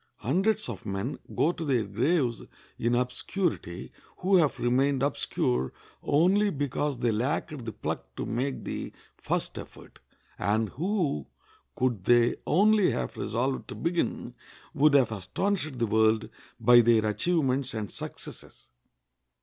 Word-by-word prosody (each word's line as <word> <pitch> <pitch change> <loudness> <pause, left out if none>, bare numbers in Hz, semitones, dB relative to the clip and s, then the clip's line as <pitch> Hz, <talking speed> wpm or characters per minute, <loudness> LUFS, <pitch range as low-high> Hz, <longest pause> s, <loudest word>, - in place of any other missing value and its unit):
Hundreds 190 - +1
of 115 -6 -6
men 100 +8 -3 0.2
go 165 - +3
to 175 - -6
their 130 -7 +1
graves 120 - 0 0.4
in 120 +1 +1
obscurity 125 - -2 0.3
who 190 +1 +3
have 155 -5 +2
remained 135 +2 +2
obscure 65 - 0 0.3
only 185 +8 +3
because 145 -2 -2
they 120 -1 +1
lacked 135 +4 -2
the 110 - -3
pluck - - -5
to - - -4
make 130 +4 -2
the - - -5 0.3
first - - -2
effort, - - -12 0.4
and 105 +3 +1
who, 160 - -1 0.5
could 120 -7 -1
they 120 -1 +4
only 205 +3 +4
have 60 -1 -3
resolved 130 +5 -2
to - - -7
begin, 170 +1 -2 0.4
would 150 +1 +4
have 130 -5 +4
astonished 150 - -2
the 120 - +1
world 110 0 +2 0.3
by 120 0 +7
their 115 -1 +4
achievements 135 +1 0
and 105 -4 -4
successes. - - -9
130 Hz, 135 wpm, -28 LUFS, 110-155 Hz, 0.5 s, by